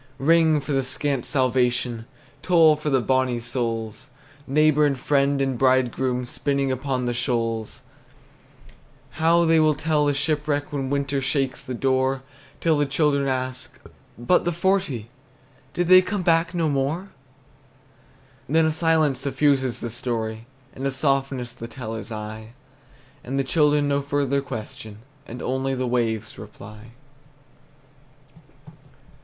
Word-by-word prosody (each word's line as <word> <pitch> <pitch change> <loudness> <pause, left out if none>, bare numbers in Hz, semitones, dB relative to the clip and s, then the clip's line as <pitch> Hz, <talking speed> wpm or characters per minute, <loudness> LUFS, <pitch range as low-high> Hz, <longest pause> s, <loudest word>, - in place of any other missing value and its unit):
Ring, 160 +2 +4
for 145 - -6
the 135 -1 +2
scant 135 0 -2
salvation! 125 -3 0 0.3
Toll, 165 -2 +5
for 150 0 -3
the 135 -3 +2
bonnie 130 0 +1
souls, 115 -1 -4 0.4
Neighbor 150 +1 +3
and 140 -2 +2
friend 140 +1 +1
and 135 -3 -1
bridegroom, 130 -1 +1
Spinning 140 +2 -1
upon 130 -1 -2
the 120 - -1
shoals! 115 -3 -2 1.4
How 170 +1 +4
they 165 0 +4
will 155 -1 +3
tell 150 0 +1
the 145 - +1
shipwreck 145 0 -1
When 135 -2 -2
winter 140 0 -1
shakes 135 -1 -1
the 125 - -5
door, 130 +1 0 0.4
Till 160 -3 +2
the 145 - +1
children 140 -1 +1
ask, 130 -1 -3 0.4
"But 120 +10 +2
the 175 - 0
forty? 165 - -1 0.6
Did 175 - +1
they 185 +1 +8
come 185 +1 -3
back 170 0 +2
no 165 -2 +1
more?" 150 +7 -1 1.4
Then 160 +2 +3
a 160 - +2
silence 155 -4 +2
suffuses 135 -2 +1
the 120 - -4
story, 115 -2 -4 0.3
And 135 +1 -3
a - - -1
softness 135 -2 -1
the 115 - -8
teller's 115 -2 -7
eye; 110 +1 -7 0.7
And 135 +2 -4
the 135 - +1
children 150 +1 +2
no 140 0 +1
further 140 -1 0
question, 110 -3 -8 0.2
And 120 - -8
only 130 +1 -1
the 130 0 -2
waves 115 -3 -2
reply. 105 +2 -12
135 Hz, 135 wpm, -23 LUFS, 120-150 Hz, 1.4 s, they